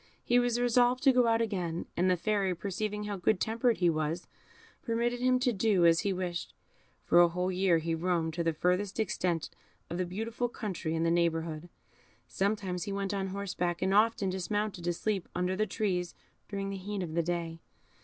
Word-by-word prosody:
He 245 +1 +4
was 245 -1 +1
resolved 245 +1 +3
to 270 - +7
go 250 -1 +4
out 230 0 +3
again, 175 -6 -3
and 185 +2 +2
the 180 - +3
Fairy, 195 -1 0
perceiving 210 +3 -3
how 205 -1 -3
good 185 +2 +1
tempered 230 +3 +1
he 175 - +2
was, 155 +2 -2 0.6
permitted 235 +1 -1
him 255 0 +3
to 250 -1 +1
do 195 -3 +3
as 165 0 +5
he 200 - 0
wished. 180 -2 -4 0.5
For 175 - +4
a 175 - +8
whole 180 +2 -1
year 185 -2 +3
he 165 +1 -2
roamed 165 -1 0
to 170 +1 -1
the 165 - +2
furthest 180 +6 0
extent 175 -6 -1 0.4
of 170 - -3
the 185 - +1
beautiful 225 +6 -3
country 185 -8 -4
in 165 - 0
the 165 - +2
neighbourhood; 165 -1 0 0.6
sometimes 195 -2 -1
he 205 - -4
went 195 0 -2
on 195 -1 -1
horseback, 185 -3 -2
and 190 +1 +1
often 210 -2 +3
dismounted 190 0 -2
to 175 - +1
sleep 195 +1 -2
under 180 +1 0
the 215 +2 0
trees 180 -3 -2 0.3
during 195 -1 -3
the 195 - -4
heat 195 0 -4
of 160 -3 -5
the 170 - +2
day. 165 -1 -3
190 Hz, 195 wpm, -30 LUFS, 175-215 Hz, 0.6 s, a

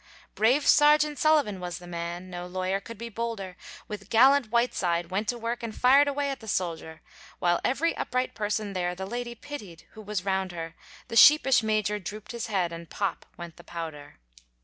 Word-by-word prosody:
Brave 250 +7 +3
Serjeant 300 0 +5
Sullivan 295 -11 +3
was 175 -1 -5
the 175 - -12
man, 175 +1 -6
No 175 0 -6
lawyer 185 +1 -2
could 230 +3 -10
be 235 +2 -6
bolder, 225 -4 -5 0.3
With 205 -2 -8
gallant 260 +1 +5
Whiteside 180 -7 0
went 205 +3 -1
to 245 - -1
work, 235 +1 -3
And 230 -2 -5
fired 275 +3 +6
away 285 0 -1
at 270 - -6
the 220 - -12
soldier; 165 -4 -3 0.4
While 175 0 +1
every 305 +6 +1
upright 255 0 -2
person 210 -1 -2
there 180 -1 -2
The 190 +1 -5
lady 240 +3 -5
pitied, 210 - -9
who 220 - -11
was 205 -2 -4
round 190 -2 -1
her, 165 -1 -6 0.4
The 230 - -5
sheepish 270 +1 +7
Major 215 -1 0
droop'd 210 +3 -8
his 235 0 -4
head, 185 -5 0
And 165 -1 -9
pop 200 -2 -3
went 170 -2 -9
the 175 - -13
powder. 160 -4 -8
210 Hz, 190 wpm, -27 LUFS, 180-240 Hz, 0.4 s, sheepish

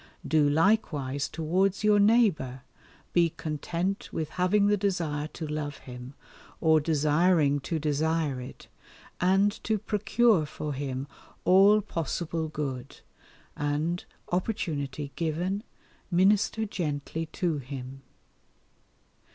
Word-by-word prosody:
Do 150 -2 +3
likewise 145 -5 +1
towards 185 +6 0
your 210 -1 +5
neighbour, 200 - +3 0.5
be 170 -1 +4
content 165 +5 -3
with 155 -2 -3
having 185 +3 +2
the 205 0 +4
desire 170 -7 -1
to 165 - -5
love 150 -1 -4
him, 125 +1 -10 0.4
or 160 -1 +4
desiring 150 0 +3
to 160 +4 -3
desire 150 -2 0
it, 125 - -10 0.5
and 195 +3 +3
to 220 -1 +1
procure 210 -3 +2
for 150 0 -5
him 135 -1 -3 0.4
all 200 +3 +6
possible 165 -3 -3
good, 135 -4 -5 0.5
and, 150 +4 -1 0.3
opportunity 150 - -2
given, 175 +5 -1 0.5
minister 200 +4 +3
gently 160 -4 -3
to 165 -5 0
him. 135 0 -8
160 Hz, 105 wpm, -28 LUFS, 145-190 Hz, 0.5 s, all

